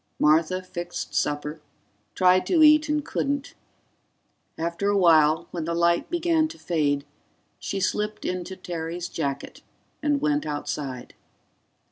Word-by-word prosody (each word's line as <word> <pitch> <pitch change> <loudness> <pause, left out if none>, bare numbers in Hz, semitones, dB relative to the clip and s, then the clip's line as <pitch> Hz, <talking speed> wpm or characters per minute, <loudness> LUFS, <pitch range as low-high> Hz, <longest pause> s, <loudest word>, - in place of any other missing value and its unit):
Martha 165 +4 +3
fixed 175 -1 -6
supper, 150 +1 -2 0.5
tried 185 0 +4
to 330 -4 +4
eat, 305 0 +6
and 300 -1 0
couldn't. 280 0 -2 1.0
After 170 +5 -1
a 205 - +2
while, 160 -2 +4
when 170 -3 -4
the 170 +1 -2
light 170 0 +2
began 335 -2 +2
to 325 +1 -11
fade, 145 - 0 0.5
she 195 - -3
slipped 210 +2 -2
into 180 +1 -3
Terry's 175 -1 -5
jacket 140 -5 -4 0.4
and 295 -1 +1
went 150 - +1
outside. 140 -3 -4
175 Hz, 125 wpm, -25 LUFS, 155-210 Hz, 1.0 s, eat